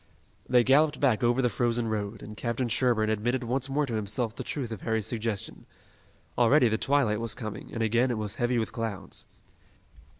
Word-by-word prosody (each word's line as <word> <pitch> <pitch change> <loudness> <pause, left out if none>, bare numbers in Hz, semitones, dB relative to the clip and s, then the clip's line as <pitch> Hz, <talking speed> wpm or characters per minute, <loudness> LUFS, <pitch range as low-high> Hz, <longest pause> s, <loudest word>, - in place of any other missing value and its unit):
They 125 -1 +5
galloped 145 +4 +3
back 125 -5 +2
over 120 +2 +2
the - - +4
frozen 120 +1 0
road, 105 -1 -3
and 105 - -9
Captain 120 +2 -2
Sherburne 115 -2 +2
admitted 120 +4 0
once 130 +3 -1
more 145 +2 +1
to 120 - -5
himself 110 +2 -1
the - - -5
truth 130 -6 -4
of 110 - -6
Harry's 110 -2 -1
suggestion. 110 -3 -4 0.7
Already 125 +1 +5
the 110 - +1
twilight 135 -7 +2
was 115 -1 -3
coming, 110 -4 -7
and 115 - -2
again 120 +4 +2
it 120 - -1
was 105 -2 -3
heavy 120 0 +2
with 110 - -1
clouds. 105 -5 -5
115 Hz, 190 wpm, -28 LUFS, 110-125 Hz, 0.7 s, They